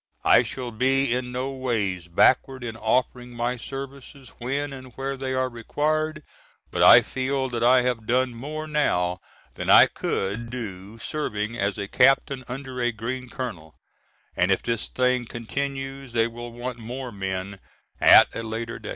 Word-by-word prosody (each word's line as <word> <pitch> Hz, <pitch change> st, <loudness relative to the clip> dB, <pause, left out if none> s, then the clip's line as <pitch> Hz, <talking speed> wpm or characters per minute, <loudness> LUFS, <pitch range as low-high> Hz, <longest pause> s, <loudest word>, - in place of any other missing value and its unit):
I -, -, +7 dB
shall 125 Hz, +1 st, -5 dB
be 130 Hz, +2 st, +2 dB
in 125 Hz, 0 st, -2 dB
no 130 Hz, +2 st, -3 dB
ways 110 Hz, -9 st, -2 dB
backward 130 Hz, +8 st, +3 dB
in 115 Hz, -2 st, -5 dB
offering 125 Hz, +2 st, -1 dB
my 120 Hz, +1 st, -1 dB
services 135 Hz, +1 st, -8 dB
when 140 Hz, +4 st, -2 dB
and 130 Hz, -2 st, -10 dB
where 135 Hz, +1 st, -3 dB
they 130 Hz, -1 st, -3 dB
are 130 Hz, 0 st, +1 dB
required, 155 Hz, +6 st, -2 dB, 0.5 s
but -, -, -1 dB
I -, -, +9 dB
feel 130 Hz, 0 st, -2 dB
that 120 Hz, -1 st, -2 dB
I 125 Hz, +1 st, +5 dB
have 120 Hz, -3 st, -2 dB
done 125 Hz, +1 st, +2 dB
more 150 Hz, +6 st, -6 dB
now 90 Hz, -13 st, 0 dB, 0.3 s
than -, -, -5 dB
I -, -, +9 dB
could 100 Hz, +5 st, -3 dB
do 105 Hz, -4 st, -7 dB
serving 115 Hz, -5 st, -3 dB
as 100 Hz, -4 st, -1 dB
a 100 Hz, -, -4 dB
captain 135 Hz, +2 st, +3 dB
under 130 Hz, 0 st, -6 dB
a 120 Hz, 0 st, +2 dB
green 120 Hz, +3 st, -5 dB
colonel, 90 Hz, -, -6 dB, 0.6 s
and 90 Hz, -, +2 dB
if 95 Hz, -, +2 dB
this 115 Hz, -2 st, -2 dB
thing 125 Hz, -1 st, 0 dB
continues 135 Hz, +2 st, -5 dB
they 115 Hz, -1 st, +3 dB
will 120 Hz, +1 st, -7 dB
want 120 Hz, +1 st, -6 dB
more 125 Hz, +3 st, -6 dB
men 95 Hz, -1 st, -4 dB, 0.4 s
at -, -, +7 dB
a -, -, -3 dB
later 115 Hz, +1 st, -5 dB
day. 105 Hz, -, -8 dB
125 Hz, 165 wpm, -25 LUFS, 115-135 Hz, 0.6 s, I